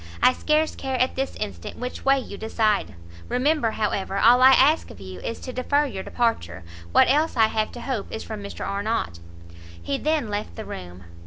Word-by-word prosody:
I 255 - +7
scarce 310 +3 +1
care 265 -1 -3
at 255 - +2
this 270 0 -3
instant 90 -4 -6
which 250 +1 -6
way 275 0 +4
you 245 -6 -6
decide; 215 - 0 0.3
remember, 280 -1 +2
however, 200 -3 -2
all 240 +5 +6
I 260 - +9
ask 295 +5 +4
of - - -12
you 95 -1 -9
is 230 - -5
to 255 - -6
defer 285 +4 +1
your 195 -9 -5
departure; 95 - -1 0.3
what - - +6
else 300 +2 +2
I 225 - +6
have 215 -1 -1
to 240 - -8
hope 240 -5 -4
is 220 - -5
from 215 -2 -6
Mr 200 - -6
Arnott." 200 - -2 0.6
He 85 +11 -3
then 305 -5 0
left 205 +1 -4
the 220 - -7
room. 90 0 -8
225 Hz, 195 wpm, -24 LUFS, 200-265 Hz, 0.6 s, I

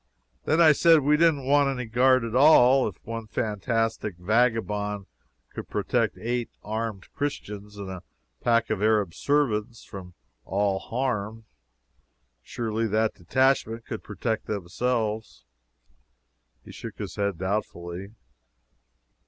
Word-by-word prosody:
Then 155 - +2
I 160 -2 +8
said 165 +1 +5
we 145 +2 +3
didn't 150 -4 +3
want 140 +1 +4
any 125 -2 -3
guard 130 +2 +4
at 115 -1 -4
all. 135 -2 +6
If - - -6
one 115 -1 -5
fantastic 110 -1 -2
vagabond 105 -1 0 0.5
could - - -7
protect - - 0
eight 120 +1 -2
armed 110 -2 -5
Christians 105 -8 -5
and 100 -1 -6
a 95 -1 -7 0.4
pack 115 -1 +2
of 105 -3 -1
Arab 105 -5 +2
servants 115 - 0
from 90 -2 -10 0.3
all 100 +2 0
harm, 115 -3 -3 1.0
surely 115 - -2
that 110 +1 +1
detachment 115 +3 +1
could 110 - -6
protect 110 +2 -3
themselves. 110 - -2 1.2
He - - -11
shook - - -9
his - - -6
head 100 -3 -1
doubtfully. 95 -1 -4
110 Hz, 120 wpm, -26 LUFS, 105-125 Hz, 1.2 s, I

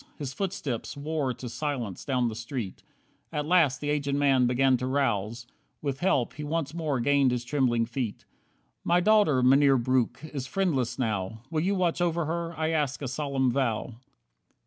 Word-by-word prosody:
His 140 -4 -5
footsteps 150 - -3
wore 145 -2 -1
to 125 - -7
silence 120 - -4
down 125 -3 +1
the 115 - -3
street. 115 -3 -5 0.5
At 150 0 -2
last 160 -5 +3
the 145 0 -1
aged 140 -1 0
man 135 -3 +3
began 130 +2 +3
to 125 +1 -3
rouse. 120 -4 -1 0.3
With 140 -2 -3
help 160 -10 +1
he 150 - -7
once 150 -1 -2
more 155 -6 -1
gained 140 +1 +3
his 125 -1 -1
trembling 120 -3 +1
feet. 120 -2 -4 0.6
"My 175 +1 +3
daughter, 185 -9 +4
Mynheer 135 +1 +5
Breuck, 130 +4 0
is 140 -4 -5
friendless 135 -12 0
now. 110 -3 -2
Will 155 -1 0
you 195 +4 +1
watch 175 -2 0
over 170 -1 +1
her? 170 +1 -3
I 160 0 0
ask 145 -4 -1
a - - -2
solemn 135 -1 0
vow." 120 -2 -1
135 Hz, 170 wpm, -27 LUFS, 125-155 Hz, 0.6 s, Mynheer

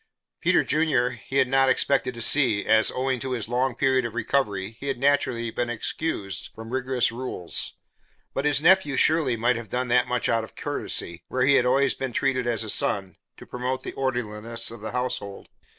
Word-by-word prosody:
Peter - - +3
Junior 145 -5 +1
he 125 +2 -9
had 130 - +4
not 135 +1 +3
expected 130 -2 +1
to 115 - -3
see, 120 -8 +4
as, 110 0 +4
owing 130 0 -1
to 130 +1 -3
his 115 -4 -2
long 125 +1 0
period 130 -1 +2
of 120 -1 -5
recovery, 110 -5 -1
he 140 - -7
had 135 - -1
naturally 125 -4 +1
been 120 +1 -2
excused 110 - -3
from 110 +1 -9
rigorous 130 -2 0
rules, 115 -8 -3 0.6
but 135 - -2
his 150 0 +1
nephew 175 -5 +4
surely 155 -7 +3
might 120 +2 +2
have 115 -3 -8
done 125 +2 -2
that 125 0 +3
much 125 -1 0
out 115 -1 +1
of 110 - -11
courtesy, 85 0 -3
where 130 0 0
he 140 - +5
had 125 -2 +4
always 135 +2 +3
been 130 -2 -5
treated 130 -2 0
as 115 -2 0
a 110 - -6
son, 95 -2 0 0.2
to - - -12
promote 125 +1 -4
the - - -6
orderliness 115 -3 -2
of 115 - -10
the 110 - -5
household. 120 -6 -4
125 Hz, 200 wpm, -25 LUFS, 115-135 Hz, 0.6 s, he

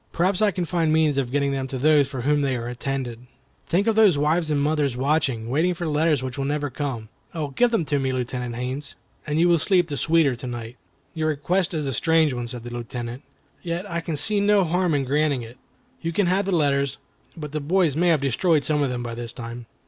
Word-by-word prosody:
Perhaps 180 +3 +1
I 215 - +5
can 185 -3 -2
find 165 -1 0
means 155 -3 +3
of 125 -3 -2
getting 140 0 +1
them 135 -1 -2
to 130 - -4
those 145 +1 +4
for 135 -2 -5
whom 145 +3 +2
they 135 -2 0
are 120 -1 -4
intended. 125 -1 -4 0.4
Think 190 +4 +1
of 225 -1 +2
those 210 -8 +5
wives 155 +3 +1
and 150 -2 +1
mothers 145 -3 0
watching, 135 -4 0
waiting 160 +8 +1
for 170 0 -4
letters 150 -2 +1
which 130 +1 -5
will 135 - -1
never 145 0 -1
come. 125 -5 -4 0.3
Oh! 155 -3 -2
give 240 - +2
them 225 -8 0
to 145 -1 0
me, 135 -1 0
Lieutenant 125 -1 -3
Haines, 130 +4 -4 0.3
and 150 +1 0
you 175 - +5
will 170 -1 +4
sleep 180 0 +2
the 145 - -3
sweeter 160 -5 +3
to 125 - -7
night." 120 0 -6 0.4
"Your 160 -2 -1
request 175 +5 0
is 155 -2 -1
a 135 - -2
strange 160 +1 +3
one," 120 -1 -4
said 120 -1 -5
the 120 0 -7
Lieutenant; 120 +1 -5 0.4
"yet 175 +3 -4
I 170 -3 -3
can 165 -2 -3
see 205 +8 +1
no 205 -1 +4
harm 175 -1 +1
in 140 - +1
granting 145 -1 +1
it. 115 +2 -12 0.4
You 165 - -2
can 200 +4 +1
have 185 +3 +1
the - - 0
letters, 140 -4 +1 0.4
but 150 -3 -6
the 155 - -2
boys 165 -1 +2
may 175 +3 +2
have 160 -4 +3
destroyed 145 +3 +2
some 150 -1 +1
of 140 - +1
them 125 -1 -3
by 120 -1 -5
this 115 -1 -6
time." 115 0 -8
145 Hz, 240 wpm, -24 LUFS, 130-165 Hz, 0.4 s, I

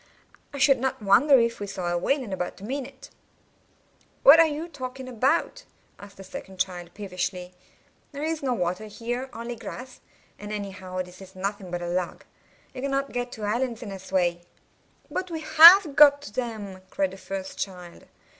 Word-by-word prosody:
I 285 - -7
should 275 -1 +4
not 260 -3 -2
wonder 265 +8 +6
if 235 -1 +1
we 205 - -5
saw 180 -2 -4
a 175 - 0
whale 265 +11 0
in 205 -5 -6
about 180 0 -4
a - - -12
minute." 270 +3 -6 1.1
"What 300 +4 +9
are 330 - +7
you 310 +2 -4
talking 260 -4 -7
about?" 275 - 0 0.4
asked 200 0 -13
the 195 - -10
second 190 0 -10
child, 175 -2 -3
peevishly. 185 -2 -4 0.6
"There 285 0 -6
is 320 0 -2
no 260 -3 0
water 180 +2 -2
here, 240 +5 -5
only 235 +1 -6
grass; 255 +2 -9 0.4
and 210 0 -8
anyhow 190 -3 -5
this 180 +1 -15
is 190 0 -13
nothing 195 0 -4
but 175 0 -4
a - - -4
log. 175 0 -3 0.5
You 255 - -7
cannot 275 0 -1
get 245 0 -3
to 220 - -8
islands 235 +3 -2
in 215 - -7
this 190 -1 -9
way." 175 -2 +1 0.7
"But 370 - -3
we 325 -2 -5
have 325 0 +8
got 285 -1 +7
to 205 - -10
them," 215 -6 -5
cried 190 -1 -1
the 190 - -10
first 190 0 -7
child. 180 -3 -7
220 Hz, 185 wpm, -25 LUFS, 190-270 Hz, 1.1 s, What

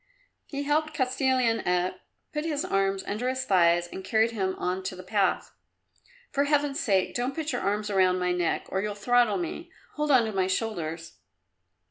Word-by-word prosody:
He 285 -1 -4
helped 305 +1 0
Kostilin 255 -3 +1
up, 180 0 0 0.3
put 300 0 -2
his 305 -3 -1
arms 195 0 0
under 230 +5 -2
his 260 0 -2
thighs 175 -4 +4
and 190 +2 -8
carried 220 +3 +2
him 190 -4 -1
on 180 +1 -2
to 185 - -3
the 185 - -10
path. 195 0 0 0.8
"For 280 0 +1
heaven's 290 0 +1
sake 195 - +1
don't 250 +3 -2
put 315 -1 -2
your - - -2
arms 205 +2 -1
round 185 -2 +3
my 180 0 0
neck 175 -1 0
or 190 - -1
you'll 210 0 -3
throttle 235 0 +3
me. 180 - -5 0.2
Hold 300 0 -2
on 255 -5 +5
to 220 - -3
my 190 -2 0
shoulders." 170 -5 -3
210 Hz, 180 wpm, -27 LUFS, 185-260 Hz, 0.8 s, on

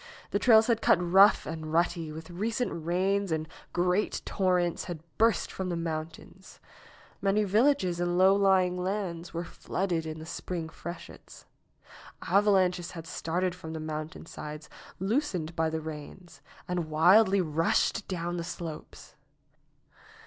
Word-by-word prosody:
The - - +1
trails 225 -3 +6
had 230 -1 +1
cut - - +5
rough 190 +3 +5
and 155 -1 -5
rutty 165 -1 0
with 160 +2 -9
recent 215 -2 -2
rains 190 +2 +1
and 160 0 -1 0.2
great 180 +3 0
torrents 180 -3 0
had 165 -3 -7 0.2
burst 225 -1 +2
from 190 -1 -4
the 175 - -1
mountains. 165 +3 -6 0.6
Many 200 +2 +2
villages 205 -3 +2
and 175 0 0
low 190 +1 +6
lying 190 -2 +3
lands 180 -3 -3
were 170 +1 -3
flooded 175 -1 -3
in 155 0 -5
the 160 - -8
spring 170 0 -5
freshets. 170 +1 -10 0.8
Avalanches 185 -2 +2
had 165 -2 -8
started 175 +3 -2
from 160 -3 -8
the 160 - -4
mountainsides, 155 -1 -7 0.3
loosened 190 - -1
by 160 -1 +1
the 160 0 -3
rains, 160 +3 -9 0.3
and 175 -3 -2
wildly 190 +6 +5
rushed 165 +5 +1
down 175 -1 -3
the 170 - -3
slopes. 165 -2 -8
175 Hz, 135 wpm, -29 LUFS, 160-195 Hz, 0.8 s, trails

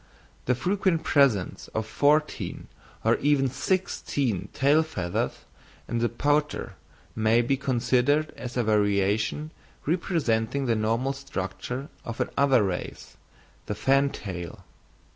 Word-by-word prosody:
The 125 - +2
frequent 180 +2 0
presence 135 - +2
of 110 0 0
fourteen 150 +6 +1 0.4
or - - +3
even 140 -2 +2
sixteen 135 - -1
tail 145 +4 +4
feathers 95 - -3 0.4
in 120 - -1
the 120 0 +1
pouter 145 +4 0 0.4
may 110 +2 +3
be 135 +3 +1
considered 130 +3 +1
as 125 +1 -6
a 120 - +2
variation 105 +7 +1 0.3
representing 140 - 0
the 120 - +2
normal 115 +5 0
structure 125 +1 -5 0.2
of 115 - -6
another 135 -5 +3
race, 95 -3 -4 0.5
the 105 - -2
fantail. 105 - -1
130 Hz, 110 wpm, -26 LUFS, 110-145 Hz, 0.5 s, tail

